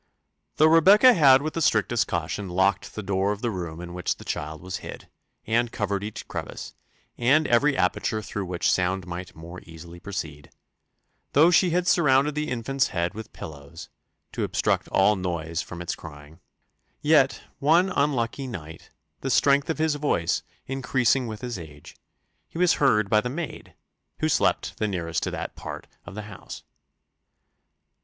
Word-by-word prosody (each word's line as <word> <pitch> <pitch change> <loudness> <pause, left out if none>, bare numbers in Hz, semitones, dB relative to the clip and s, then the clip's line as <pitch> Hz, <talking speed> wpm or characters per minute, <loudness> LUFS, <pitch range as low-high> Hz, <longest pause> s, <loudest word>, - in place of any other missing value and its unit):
Though 155 - +5
Rebecca 195 +10 +7
had 140 - +6
with 155 +1 -2
strictest 110 -1 +2
caution 85 +4 -3
locked 95 +2 0
the 110 - -5
door 95 +1 0
of 105 0 -4
the 120 - 0
room 85 -4 -5
in 90 0 -8
which 90 -1 -2
the - - -12
child 75 +1 -4
was 90 +2 -5
hid, - - -10 0.4
and 115 +1 +1
covered 100 -3 -2
each 105 0 -7
crevice, - - -6 0.5
and 140 +6 +4
every 135 +4 +3
aperture 110 -1 0
through 100 0 -4
which 90 -1 0
sound 95 0 0
might 90 +1 -7
more 85 +3 -10
easily 85 +1 -12
proceed; 80 -7 -6 0.8
though 160 +5 +6
she 180 +1 +4
had 180 +1 0
surrounded 145 -4 +4
the 150 +1 -2
infant's 130 +2 0
head 85 0 -2
with 110 +1 -9
pillows, 75 +1 -10 0.4
to - - -3
obstruct - - 0
all 100 +2 +3
noise 85 -3 -3
from 90 -3 -8
his 85 - -3
crying; 75 +1 -12 0.6
yet - - +3 0.2
one 170 +6 +4
unlucky 135 -4 0
night, 80 -9 -9 0.3
the 135 - -3
strength 140 +3 +3
of 160 - -1
his 160 -1 +1
voice 145 - 0 0.2
increasing 130 -1 +1
with 110 -1 -7
his 120 -5 -4
age, 75 -3 -12 0.5
he - - -10
was 180 0 +4
heard 105 -7 +4
by 105 +2 +3
the 125 - -3
maid, 155 +4 -6 0.4
who - - 0
slept - - +1
the 110 - +1
nearest 85 -4 -2
to - - -1
that - - -5
part - - -7 0.2
of 85 - -9
the 105 - -5
house. 105 -2 -10
105 Hz, 165 wpm, -25 LUFS, 90-140 Hz, 0.8 s, Rebecca